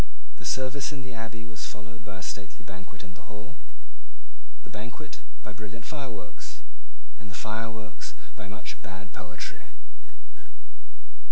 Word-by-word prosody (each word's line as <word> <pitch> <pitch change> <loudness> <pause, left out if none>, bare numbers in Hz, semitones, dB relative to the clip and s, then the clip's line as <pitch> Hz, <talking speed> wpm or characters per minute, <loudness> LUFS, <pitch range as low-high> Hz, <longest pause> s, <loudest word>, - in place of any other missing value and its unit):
The - - -2
service 130 +2 +7
in 140 -3 +1
the 130 -1 -1
Abbey 115 0 +1
was 115 -1 +1
followed 110 +2 -3
by 100 -3 -1
a 95 - -1
stately 100 +3 +1
banquet 95 -1 -4
in 90 - -5
the 90 - -8
Hall, 110 +7 -3 1.1
the - - -5
banquet 110 +3 -1 0.2
by 105 - 0
brilliant 110 +2 -2
fireworks, 135 -8 -1 0.6
and 105 - -3
the 95 - -2
fireworks 110 -1 +2 0.2
by 105 -2 -2
much 105 +2 -1
bad 95 -1 -3
poetry. 90 0 0
110 Hz, 140 wpm, -36 LUFS, 100-115 Hz, 1.1 s, service